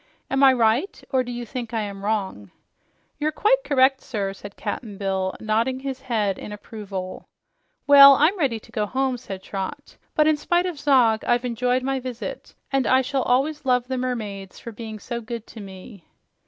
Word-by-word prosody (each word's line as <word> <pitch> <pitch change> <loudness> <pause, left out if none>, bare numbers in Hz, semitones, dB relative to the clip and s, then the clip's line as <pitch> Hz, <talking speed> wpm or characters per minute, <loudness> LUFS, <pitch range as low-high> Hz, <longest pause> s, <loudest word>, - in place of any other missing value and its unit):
Am 270 +1 +2
I 270 - +9
right, 245 - +1
or 260 -2 +3
do 245 - -6
you 240 0 -5
think 235 -1 -6
I 220 - 0
am 200 -1 -6
wrong?" 195 - -2 0.7
"You're 305 +1 0
quite - - +2
correct, 270 -1 +3
sir," 200 -5 -3
said 200 0 -11
Cap'n 210 -5 -5
Bill, 190 -1 -1
nodding 230 +4 0
his 270 -1 -5
head 215 -6 -1
in - - -8
approval. 200 -3 -7 0.6
"Well, 280 -1 +10
I'm 310 +8 +3
ready 270 - 0
to - - -18
go 210 -1 -1
home," 260 +2 0
said 195 -6 -8
Trot. 200 +9 -6 0.2
"But 305 - +4
in 310 -1 +3
spite 350 +4 +1
of 350 -5 -4
Zog, 245 -7 +3
I've 240 +1 +1
enjoyed 250 +1 0
my 270 0 -1
visit, 250 -2 -7 0.2
and 270 -1 +1
I 260 0 +4
shall 270 +1 -1
always 280 +5 +1
love 250 -2 +1
the 260 0 -2
mermaids 210 -7 -4
for 235 - -8
being 220 0 -7
so 235 +3 -5
good 230 0 -6
to 225 - -12
me." 195 -1 -11
245 Hz, 190 wpm, -23 LUFS, 210-270 Hz, 0.7 s, Well